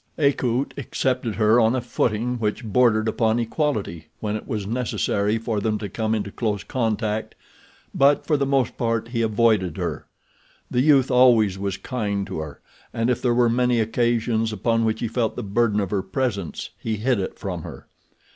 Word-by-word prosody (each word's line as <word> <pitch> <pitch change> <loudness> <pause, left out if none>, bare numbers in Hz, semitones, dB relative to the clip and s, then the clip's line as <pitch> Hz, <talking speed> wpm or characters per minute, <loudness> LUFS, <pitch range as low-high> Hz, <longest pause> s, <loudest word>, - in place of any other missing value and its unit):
Akut 135 -3 +1
accepted 125 -3 -1
her 110 +3 +4
on 115 +1 +3
a - - +1
footing 120 0 -1
which 110 +2 -2
bordered 110 -1 +3
upon 110 0 +1
equality 115 - -2
when 105 -1 -2
it 110 - -6
was 105 -3 -3
necessary 110 -2 0
for 110 -1 -2
them 105 +1 0
to 105 - -5
come 110 +3 -1
into 100 -2 -3
close 105 -3 -2
contact; 110 -4 -2 0.6
but 140 +1 +3
for 155 - +2
the 140 -1 0
most 135 -3 0
part 115 -1 -1
he 120 -1 -1
avoided 110 -5 +2
her. - - -4 0.6
The 125 - +2
youth 135 -2 +4
always 115 -6 +4
was 100 0 -2
kind 105 -6 -2
to - - -5
her, 80 -2 -7 0.3
and 115 +2 0
if 125 - -1
there 120 -2 +2
were 120 -1 +4
many 125 0 +2
occasions 115 0 +1
upon 115 +2 0
which 110 0 -1
he 120 - 0
felt 115 0 -1
the 125 - -4
burden 105 +1 +1
of 100 -3 -2
her 100 -2 +1
presence 100 - -3
he 110 -1 -2
hid 115 +2 0
it 95 - -4
from - - -4
her. - - -10
115 Hz, 185 wpm, -23 LUFS, 105-125 Hz, 0.6 s, her